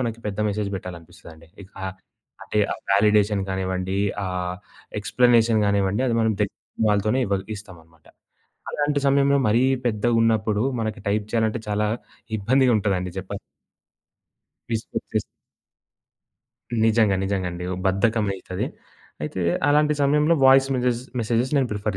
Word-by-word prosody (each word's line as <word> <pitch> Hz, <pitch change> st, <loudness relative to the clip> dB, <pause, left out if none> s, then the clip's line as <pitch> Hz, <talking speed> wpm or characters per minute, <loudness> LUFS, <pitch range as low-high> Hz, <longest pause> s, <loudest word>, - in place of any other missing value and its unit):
మనకి 115 Hz, -2 st, -3 dB
పెద్ద 105 Hz, 0 st, -3 dB
మెసేజ్ 105 Hz, 0 st, -2 dB
పెట్టాలనిపిస్తదండి. 85 Hz, -2 st, -11 dB, 0.2 s
ఇకా 95 Hz, 0 st, -12 dB, 0.6 s
అంటే, 105 Hz, -, -2 dB
ఆ -, -, -2 dB, 0.2 s
వాలిడేషన్ 105 Hz, 0 st, +3 dB
కానివ్వండి, 95 Hz, 0 st, -2 dB, 0.3 s
ఆహ్, 90 Hz, -1 st, -3 dB, 0.4 s
ఎక్స్‌ప్లనేషన్ 115 Hz, 0 st, +3 dB
గానివ్వండి, 100 Hz, +2 st, +1 dB
అది 115 Hz, -, +1 dB
మనం 110 Hz, 0 st, +2 dB
దగ్గరున్న 100 Hz, -, -3 dB, 0.3 s
వాళ్ళతోనే 105 Hz, +5 st, +1 dB
ఇవ్వ 100 Hz, 0 st, +1 dB, 0.2 s
ఇస్తామన్నమాట. 80 Hz, -6 st, -15 dB, 0.7 s
అలాంటి 145 Hz, -1 st, 0 dB
సమయంలో, 140 Hz, 0 st, +4 dB
మరీ 115 Hz, +4 st, +3 dB, 0.2 s
పెద్దగున్నప్పుడు 110 Hz, -1 st, +1 dB, 0.2 s
మనకి 110 Hz, -1 st, -3 dB
టైప్ 105 Hz, +1 st, 0 dB
చేయాలంటే 115 Hz, 0 st, +1 dB
చాలా 105 Hz, +1 st, +1 dB, 0.5 s
ఇబ్బందిగా 130 Hz, +5 st, +3 dB
ఉంటదండి 95 Hz, -3 st, -1 dB
చెప్పా 95 Hz, +2 st, -6 dB, 1.4 s
విసుగొచ్చేసి 110 Hz, -1 st, -3 dB, 1.6 s
నిజంగా, 110 Hz, -3 st, +3 dB
నిజంగా 95 Hz, -2 st, -1 dB
అండి. 90 Hz, +1 st, -6 dB
ఓహ్! 90 Hz, -, -4 dB
బద్ధకమయితాది. 100 Hz, -2 st, 0 dB, 0.6 s
అయితే 75 Hz, +5 st, -4 dB, 0.3 s
అలాంటి 150 Hz, +1 st, +3 dB
సమయంలో, 150 Hz, +3 st, +3 dB
వాయిస్ 135 Hz, 0 st, +6 dB
మెసేజెస్ 125 Hz, -1 st, 0 dB, 0.2 s
మెసేజెస్ 115 Hz, +3 st, 0 dB
నేను 130 Hz, -3 st, +1 dB
ప్రిఫర్ 105 Hz, -1 st, -2 dB
105 Hz, 115 wpm, -23 LUFS, 95-120 Hz, 1.6 s, వాయిస్